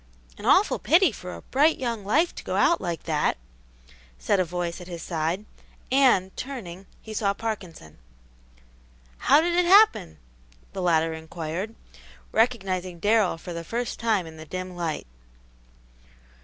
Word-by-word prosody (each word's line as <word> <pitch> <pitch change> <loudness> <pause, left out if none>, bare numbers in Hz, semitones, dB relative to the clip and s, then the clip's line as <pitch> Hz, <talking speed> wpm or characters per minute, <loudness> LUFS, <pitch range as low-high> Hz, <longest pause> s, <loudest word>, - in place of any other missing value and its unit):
"An - - -7
awful - - +4
pity 335 - +4
for 180 -4 -8
a - - -11
bright 300 +5 +3
young 235 -5 -3
life 300 - +2
to - - -9
go - - -3
out 340 - +3
like 170 -3 -4
that!" 155 - 0 0.8
said 125 - +1
a - - +4
voice 175 0 -4
at 175 - -10
his 170 -3 -7
side, 170 +4 -2 0.5
and, 250 -9 +3
turning, 195 -9 -7 0.2
he 220 - -8
saw 200 -2 0
Parkinson. 180 - -6 1.2
"How 300 - +5
did 345 +1 0
it 355 0 +3
happen?" 390 - +5 0.6
the 190 - -4
latter 165 -2 +2
inquired, 160 +6 -5 0.6
recognizing 190 -6 0
Darrell 205 -1 +2
for 175 +1 -8
the 170 0 -5
first 235 +7 -4
time 220 -6 +1
in 160 -1 -11
the 155 - -10
dim 185 +2 -6
light. 170 -3 -3
185 Hz, 150 wpm, -25 LUFS, 170-235 Hz, 1.2 s, How